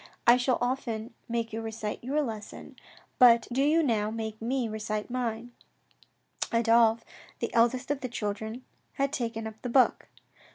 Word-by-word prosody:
I 240 - +8
shall 250 0 +1
often 245 -2 -2 0.2
make 230 -1 -2
you 225 - -3
recite 220 -1 -5
your 290 +4 0
lesson, 220 -5 -7 0.4
but 235 -2 +7
do 265 - +1
you 310 +4 +4 0.3
make 220 -1 -5
me 250 +2 0
now 225 - -4
recite 215 +1 -3
mine." 240 -1 -3 1.0
Adolphe, 230 0 +4 0.3
the - - -4
eldest 245 +4 +2
of 290 - -2
the 255 - -3
children, 220 +2 -4 0.3
had 275 0 -1
taken 230 -3 -3
up 220 0 -8
the 250 - -4
book. 255 +1 +3
235 Hz, 155 wpm, -28 LUFS, 220-255 Hz, 1.0 s, I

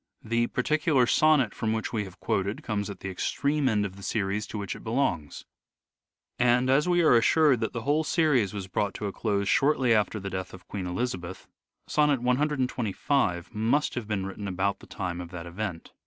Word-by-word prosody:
The 115 +1 +1
particular 150 0 +2
sonnet 145 -5 +3
from 110 0 -1
which 110 +1 -3
we 105 -3 -1
have 95 0 -13
quoted 100 -2 -1
comes 105 -2 -2
at 100 - -8
the 95 - -4
extreme 140 +9 0
end 105 -3 +1
of 95 -1 -7
the - - -11
series 100 0 -1
to - - -6
which 100 -2 -4
it - - -11
belongs; 110 - -1 0.9
and, 125 +1 +3
as 150 +6 +3
we 175 -1 +3
are 155 - +6
assured 135 +3 +4
that 110 - -2
the 115 -2 -4
whole 150 +5 +2
series 150 - +2
was 100 -2 -5
brought 100 +2 -1
to 105 - -4
a 100 - -2
close 100 -1 -1
shortly 135 -1 +3
after 105 0 +1
the 100 -1 -6
death 95 0 -5
of 90 - -16
Queen 95 -3 -4
Elizabeth, 90 -2 -4 0.4
sonnet 150 -3 +3
125 125 - 0
must 115 +8 +1
have 120 -4 -4
been 100 -3 -2
written 100 +1 -6
about 95 +1 -1
the - - -15
time 90 -1 -4
of 85 - -8
that 85 -1 -7
event. 90 -1 -5
110 Hz, 200 wpm, -27 LUFS, 95-130 Hz, 0.9 s, are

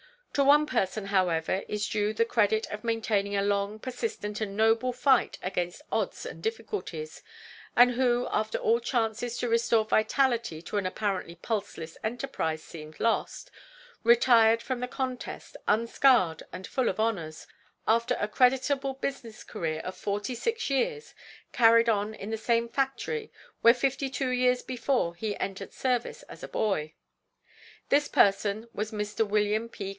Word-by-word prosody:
To 280 - +3
one 295 +2 +6
person, 215 -6 -1
however, 185 -2 +1
is 210 -1 -2
due 210 -1 0
the 230 +1 +2
credit 220 -1 +2
of 210 +2 -6
maintaining 215 -3 0
a 200 - +1
long, 200 +1 0
persistent 220 -3 -4
and 200 -2 -3
noble 225 +3 +3
fight 260 0 +2
against 180 +4 -3
odds - - -2
and - - -8
difficulties, 390 - -5 0.5
and 245 +1 +7
who, 245 0 +1
after 215 0 0
all 230 +1 +2
chances 235 0 -1
to 245 - -2
restore 230 -1 +2
vitality 225 - +1
to 210 - -4
an 200 - -1
apparently 185 -3 -3
pulseless 180 -4 -4
enterprise 215 -9 -3
seemed 155 -1 -11
lost, 230 -1 -1 0.5
retired 230 -1 +5
from 260 -2 -3
the 250 - -3
contest, 255 -1 -5
unscarred 225 - +3
and 185 - -7
full 255 +4 0
of 190 - -4
honors, 180 -9 -2 0.4
after 235 +2 +2
a 205 - 0
creditable 265 +3 +2
business 265 -5 -5
career 160 -1 -3
of 185 - -6
forty 205 +4 -3
six 460 - -2
years, 450 - -1 0.4
carried 230 -1 +5
on 210 0 0
in 205 +1 -7
the 220 - -1
same 230 +1 +1
factory 275 - -2 0.3
where 235 - +8
fifty 270 +2 -1
two 265 -1 -2
years 250 0 +2
before 250 -7 -1
he 205 +4 -4
entered 195 0 -5
service 250 -2 -1
as - - -12
a - - -6
boy. 160 -8 -1 1.0
This 290 +1 +3
person 205 +2 +2
was 210 +2 -3
Mr. 210 0 -1
Wm. 210 +2 +1
P. 200 -4 -6
225 Hz, 150 wpm, -28 LUFS, 200-250 Hz, 1.0 s, where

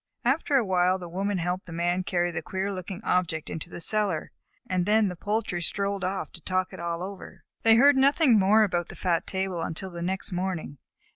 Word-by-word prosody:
After 275 +3 +1
a 250 -4 +4
while 185 -1 +2
the 180 -2 -8
Woman 195 +3 -2
helped 180 +2 -2
the - - -9
Man 175 +2 0
carry 175 -2 0
the - - -3
queer 190 +1 -3
looking 185 +1 -6
object 165 -4 0
into 160 +2 -5
the - - -8
cellar, 200 -3 +1 0.4
and 185 0 0
then 210 -1 +4
the 180 - -6
poultry 205 -1 -2
strolled 200 +2 -1
off 190 +1 -2
to - - -12
talk 185 0 -1
it - - -8
all 170 0 -3
over. 195 +1 -9 0.2
They 225 0 +6
heard 280 +4 +6
nothing 270 -3 +5
more 210 +3 +5
about 175 -4 0
the - - -10
fat 170 -3 0
table 190 -3 -2
until 185 +4 -4
the 170 -1 -7
next 190 +3 -2
morning. 175 -6 -3
185 Hz, 210 wpm, -27 LUFS, 175-200 Hz, 0.4 s, They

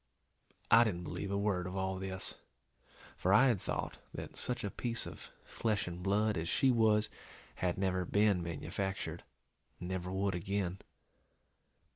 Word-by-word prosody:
I 115 +1 +9
didn't 90 -6 -1
believe 100 - -4
a 100 - 0
word 100 -3 0
of 90 - -5
all 95 0 -1
this, 95 -1 -3 0.8
for 95 - +1
I 130 +6 +7
had 115 -6 +1
thought - - -3 0.2
that - - -6
such 125 - -1
a 100 - -2
piece 115 -1 -2
of - - -9
flesh 110 -4 -1
and 90 0 -5
blood 105 0 +2
as 80 +1 -2
she 135 - +4
was 110 -2 +4 0.5
had 90 -1 0
never 95 -1 +1
been 100 0 +3
manufactured, 95 +4 -3 0.6
and 90 - -5
never 90 -1 -3
would 95 +1 0
again. 95 +1 -2
95 Hz, 155 wpm, -34 LUFS, 90-105 Hz, 0.8 s, I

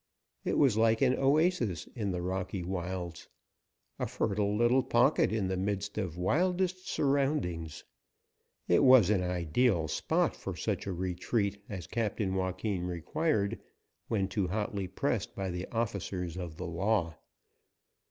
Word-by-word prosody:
It - - 0
was 130 -7 +4
like 115 +2 +3
an 130 -1 +4
oasis 135 - +2
in 105 -5 -2
the 90 -2 -2
rocky 95 0 -3
wilds. 90 -1 -4 0.7
A - - -1
fertile 100 0 0
little 120 +3 +4
pocket 120 -2 +3
in 110 -4 0
the 95 - -1
midst 100 +1 -2
of 90 -5 -3
wildest 180 - 0
surroundings, 135 - 0 0.8
it 90 - +4
was 130 -7 +7
an 100 -3 +2
ideal 90 +1 +1
spot - - 0
for - - -6
such - - -2
a - - -1
retreat 100 +3 -1
as 95 -4 -5
Captain 105 -4 -1
Joaquin 95 +1 -1
required 100 - -1 0.5
when 100 -4 0
too 100 -1 -1
hotly 100 0 -2
pressed - - -2
by 95 -1 -3
the 90 +1 -4
officers 100 -6 -3
of 85 -4 -6
the - - -5
law. 85 0 0
100 Hz, 140 wpm, -31 LUFS, 90-115 Hz, 0.8 s, was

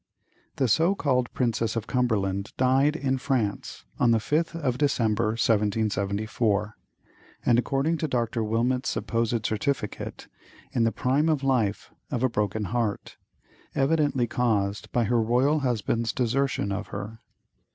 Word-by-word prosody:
The 135 -3 +1
so 165 - +3
called 125 -8 0
"Princess 115 -2 0
of 115 -2 -2
Cumberland" 105 -7 -1
died 135 +4 +3
in 135 -4 -1
France, 125 -7 -2
on 120 - +4
the 115 - +5
5th 165 +8 -1
of 130 -5 -1
December, 110 -7 +1
1774, 105 -1 0 0.7
and, 120 0 +4
according 140 +6 0
to 155 - -1
Dr. 120 -3 -1
Wilmot's 120 +4 0
supposed 115 -1 -1
certificate, 110 +1 -3 0.4
"in 115 - +2
the 115 - +2
prime 140 +7 +1
of 150 -3 +1
life 120 -7 0 0.2
of 125 -3 -2
a 130 - +3
broken 105 -1 -1
heart," 110 0 -2 0.6
evidently 140 -3 +2
caused 105 -4 -1
by 120 - +2
her 115 +1 +2
royal 125 +7 +2
husband's 115 -3 0
desertion 125 -4 0
of 100 +2 -3
her. 110 +2 -7
120 Hz, 135 wpm, -26 LUFS, 110-135 Hz, 0.7 s, the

